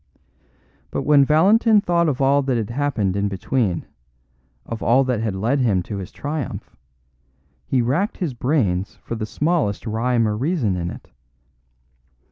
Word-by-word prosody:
But -, -, -3 dB
when 145 Hz, -2 st, +5 dB
Valentin 205 Hz, -, +4 dB
thought 170 Hz, -4 st, +1 dB
of 135 Hz, -, -2 dB
all 140 Hz, +1 st, +3 dB
that 135 Hz, -3 st, 0 dB
had 110 Hz, -1 st, -3 dB
happened 120 Hz, -8 st, -1 dB
in 100 Hz, 0 st, 0 dB
between, 100 Hz, -1 st, -1 dB, 0.8 s
of 115 Hz, -, -6 dB
all 130 Hz, +4 st, +4 dB
that 125 Hz, -4 st, -1 dB
had 110 Hz, -4 st, -2 dB
led 115 Hz, +9 st, 0 dB
him 105 Hz, -8 st, +1 dB
to 100 Hz, -, -6 dB
his 95 Hz, -2 st, -7 dB
triumph, 145 Hz, -2 st, -5 dB, 0.9 s
he 125 Hz, -2 st, +1 dB
racked 160 Hz, -, 0 dB
his 170 Hz, -8 st, -2 dB
brains 115 Hz, -, 0 dB
for -, -, -6 dB
the 110 Hz, -2 st, -4 dB
smallest 150 Hz, -, -1 dB
rhyme 115 Hz, +1 st, +1 dB
or 105 Hz, -, -1 dB
reason 130 Hz, -, 0 dB
in 85 Hz, -1 st, -3 dB
it. -, -, -11 dB
125 Hz, 155 wpm, -21 LUFS, 105-145 Hz, 0.9 s, when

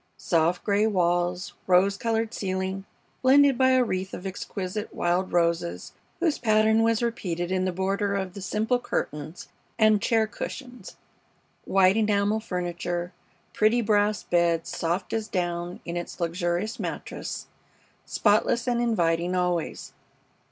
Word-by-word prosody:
Soft 170 Hz, +1 st, +1 dB
gray 205 Hz, +1 st, +2 dB
walls, 175 Hz, -2 st, 0 dB
rose 190 Hz, +2 st, +4 dB
colored 225 Hz, +1 st, -1 dB
ceiling, 190 Hz, 0 st, -3 dB, 0.4 s
blended 275 Hz, +1 st, +6 dB
by 260 Hz, +1 st, +4 dB
a 255 Hz, -1 st, +4 dB
wreath 190 Hz, -4 st, -3 dB
of 180 Hz, -, -9 dB
exquisite 195 Hz, +2 st, -5 dB
wild 175 Hz, +2 st, 0 dB
roses, 170 Hz, -, 0 dB, 0.3 s
whose 330 Hz, -4 st, +1 dB
pattern 220 Hz, -1 st, +3 dB
was 230 Hz, 0 st, +2 dB
repeated 180 Hz, -7 st, -2 dB
in 185 Hz, 0 st, +1 dB
the 185 Hz, -, 0 dB
border 195 Hz, +2 st, -1 dB
of 190 Hz, -2 st, -3 dB
the 200 Hz, -, -8 dB
simple 220 Hz, +6 st, 0 dB
curtains 155 Hz, -7 st, -4 dB, 0.3 s
and 215 Hz, -2 st, +4 dB
chair 225 Hz, 0 st, +2 dB
cushions, 245 Hz, 0 st, -8 dB, 0.7 s
white 190 Hz, 0 st, +4 dB
enamel 210 Hz, 0 st, +2 dB
furniture, 175 Hz, -2 st, -3 dB, 0.4 s
pretty 220 Hz, +3 st, +3 dB
brass 210 Hz, -1 st, +2 dB
bed 170 Hz, -1 st, +1 dB
soft 170 Hz, +3 st, -2 dB
as 220 Hz, -1 st, -1 dB
down 175 Hz, -2 st, -3 dB
in 170 Hz, -, -4 dB
its 175 Hz, +2 st, -5 dB
luxurious 175 Hz, +4 st, -1 dB
mattress, -, -, -5 dB, 0.6 s
spotless 220 Hz, +3 st, +2 dB
and 240 Hz, -1 st, +1 dB
inviting 175 Hz, -6 st, +1 dB
always. 180 Hz, -2 st, -2 dB
195 Hz, 130 wpm, -26 LUFS, 175-220 Hz, 0.7 s, blended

